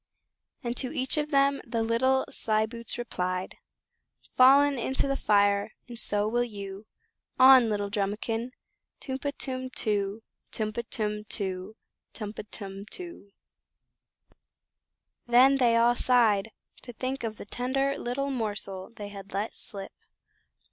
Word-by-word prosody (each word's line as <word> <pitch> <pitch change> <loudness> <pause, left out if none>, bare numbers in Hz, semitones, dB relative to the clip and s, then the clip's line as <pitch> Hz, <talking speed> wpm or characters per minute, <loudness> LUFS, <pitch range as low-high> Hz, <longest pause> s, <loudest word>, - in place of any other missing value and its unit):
And 240 0 -2
to 255 - -2
each 260 0 0
of 300 0 0
them 275 -1 +3
the 230 -2 -2
little 260 +4 +2
slyboots 220 +2 -1
replied: 185 -6 -3 0.7
"Fallen 275 +1 +6
into 265 +4 0
the 275 - 0
fire, 205 -2 +2
and 240 -2 -8
so 205 -2 0
will 240 +2 +1
you 200 -2 -7 0.5
On 260 -2 +8
little 205 -1 -1
Drumikin. 215 +4 -2 0.5
Tum 265 0 -4
pa, 285 - -2
tum 255 -1 -4
too; 210 -3 -1 0.3
Tum 215 -1 -3
pa, 235 - -2
tum 210 -1 -2
too; 190 -1 -4 0.4
Tum 210 -2 -6
pa, - - -6
tum 195 -1 -7
too!" 340 - -9 2.0
Then 255 +3 +6
they 235 -3 +4
all 235 +1 +5
sighed 225 -5 +3 0.3
to 245 - -9
think 255 +3 -3
of 220 -1 -3
the - - -8
tender 270 +5 0
little 275 +3 -2
morsel 205 -6 -3
they 210 -3 -8
had 200 -1 -10
let 205 +3 -2
slip. 195 -3 -3
230 Hz, 135 wpm, -28 LUFS, 205-255 Hz, 2.0 s, On